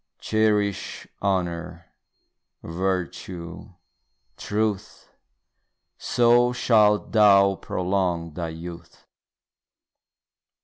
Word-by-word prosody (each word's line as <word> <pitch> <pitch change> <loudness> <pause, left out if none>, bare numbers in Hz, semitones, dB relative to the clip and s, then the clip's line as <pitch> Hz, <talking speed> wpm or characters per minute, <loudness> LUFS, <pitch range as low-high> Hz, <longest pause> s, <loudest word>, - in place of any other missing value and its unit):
Cherish 105 -2 -1 0.2
honour, 85 -3 -3 0.7
virtue, 90 -1 -4 0.6
truth, 105 -1 -3 0.9
So 120 0 +3
shalt 105 -4 +3
thou 100 -2 +5
prolong 90 -3 -2
thy 85 0 -4
youth. 85 +1 -10
95 Hz, 55 wpm, -24 LUFS, 85-105 Hz, 0.9 s, thou